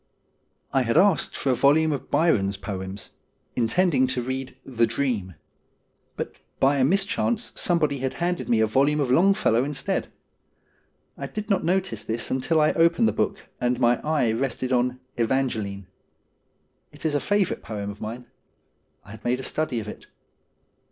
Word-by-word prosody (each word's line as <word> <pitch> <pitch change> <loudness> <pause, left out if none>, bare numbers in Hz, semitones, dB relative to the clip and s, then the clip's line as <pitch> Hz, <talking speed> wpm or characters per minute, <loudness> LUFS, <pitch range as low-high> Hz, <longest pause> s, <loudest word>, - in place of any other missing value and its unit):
I 135 - +4
had 115 -2 +1
asked 195 -7 +3
for 135 - +1
a - - +2
volume 155 +5 +4
of 140 - -4
Byron's 105 - +2
poems, 95 0 -6 0.4
intending 130 +3 +2
to 125 -1 -2
read 130 +1 -4
' - - -37
The 115 - +6
Dream,' 115 - -2 0.8
but - - -5 0.2
by 140 +2 +4
a 135 - +3
mischance 200 - +1
somebody 150 -5 +1
had 130 0 -2
handed 175 0 -2
me 115 -2 +3
a - - +5
volume 140 +7 +2
of 135 -4 0
Longfellow 175 - +4
instead. 145 +7 -2 1.1
I - - -4
did 215 -1 -5
not 195 - +2
notice 185 +2 0
this 115 +1 -3
RUTH 130 +3 -2
153 155 -2 +4
until 165 - +1
I - - +8
opened 170 +8 +4
the - - 0
book 200 - -2
and 125 0 +1
my 120 -1 +3
eye 150 -7 +1
rested 130 +2 -1
on 125 0 +1
' 130 - -41
Evangeline.' 110 -6 -1 1.1
It 145 - -13
was 160 -2 0
a 145 - +2
favourite 205 +3 0
poem 105 -2 -5
of 100 - -13
mine. 115 +3 -6 0.8
I 100 - -12
had 110 0 -11
made 125 +1 0
a - - -5
study 145 -6 -1
of 105 - -7
it. - - -9
130 Hz, 175 wpm, -25 LUFS, 115-160 Hz, 1.1 s, I